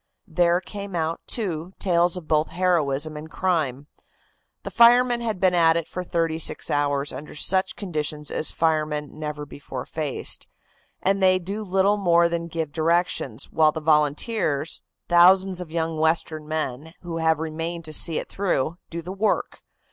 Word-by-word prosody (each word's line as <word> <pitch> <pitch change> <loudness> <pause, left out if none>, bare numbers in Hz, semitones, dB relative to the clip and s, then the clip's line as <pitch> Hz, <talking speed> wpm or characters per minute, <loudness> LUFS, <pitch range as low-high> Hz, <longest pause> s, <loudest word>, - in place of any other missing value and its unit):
"There 175 0 +2
came 200 0 -7
out, 165 0 -2
too, 180 -5 -2
tales 175 -1 +2
of 170 -4 -8
both 155 0 +2
heroism 155 -5 0
and 150 +1 -8
crime. 155 -8 -1 0.8
The - - -6
firemen 240 +1 +5
had 220 -5 -2
been 185 -1 +3
at 165 -1 +4
it 165 - -3
for 180 - -5
thirty 165 -2 -1
six - - 0
hours 145 -1 0
under 150 - -9
such 190 +5 +1
conditions 150 -5 -4
as 155 - 0
firemen 155 -2 -1
never 150 -1 -5
before 135 -3 -8
faced, 150 -4 -2 0.6
and 195 +1 +1
they 185 -1 +5
do 200 +4 -5
little 195 +1 +2
more 170 -3 +4
than 170 0 -3
give 160 -2 -4
directions, 160 -6 -1
while 155 -1 +4
the 160 - -5
volunteers, 150 +1 0 0.3
thousands 185 +1 +5
of 175 - -7
young 160 -1 -2
Western 160 -1 0
men 155 0 -4
who 170 -2 -5
have 160 -1 +2
remained 165 +2 -4
to 155 - -6
see 160 +1 +3
it - - -3
through, 170 -4 -1
do 170 0 -6
the 180 +3 -6
work. 205 +2 -1
165 Hz, 165 wpm, -24 LUFS, 155-180 Hz, 0.8 s, firemen